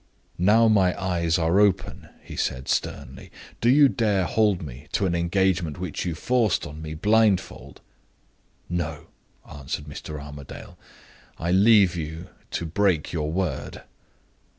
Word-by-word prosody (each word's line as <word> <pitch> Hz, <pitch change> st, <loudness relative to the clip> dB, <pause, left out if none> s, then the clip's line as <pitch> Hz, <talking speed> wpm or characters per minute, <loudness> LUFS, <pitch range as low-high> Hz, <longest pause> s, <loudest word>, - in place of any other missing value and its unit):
"Now 110 Hz, +5 st, +5 dB
my 95 Hz, -5 st, +3 dB
eyes 85 Hz, -3 st, 0 dB
are 85 Hz, +3 st, +2 dB
open," 105 Hz, -3 st, +1 dB
he -, -, -10 dB
said, 65 Hz, 0 st, -2 dB
sternly, 65 Hz, +2 st, -3 dB, 0.3 s
"do 120 Hz, -, +3 dB
you 140 Hz, +2 st, +7 dB
dare 105 Hz, -7 st, +1 dB
hold 100 Hz, -1 st, +1 dB
me 70 Hz, 0 st, -10 dB
to 100 Hz, -, +1 dB
an 90 Hz, -, 0 dB
engagement 85 Hz, -1 st, 0 dB
which 90 Hz, -2 st, -4 dB
you 85 Hz, -2 st, -2 dB
forced 120 Hz, +1 st, +1 dB
on 75 Hz, +2 st, -9 dB
me 80 Hz, 0 st, -6 dB
blindfold?" 95 Hz, -, +1 dB, 0.9 s
"No," 80 Hz, -3 st, -4 dB, 0.4 s
answered 75 Hz, +1 st, -6 dB
Mr. 75 Hz, +1 st, -8 dB
Armadale. 70 Hz, -1 st, -10 dB, 0.6 s
"I 85 Hz, +2 st, -2 dB
leave 100 Hz, -1 st, +5 dB
you 80 Hz, +2 st, -6 dB, 0.2 s
to 85 Hz, -, -3 dB
break 85 Hz, -1 st, 0 dB
your 75 Hz, -2 st, -2 dB
word." 90 Hz, 0 st, -3 dB
90 Hz, 135 wpm, -24 LUFS, 80-100 Hz, 0.9 s, you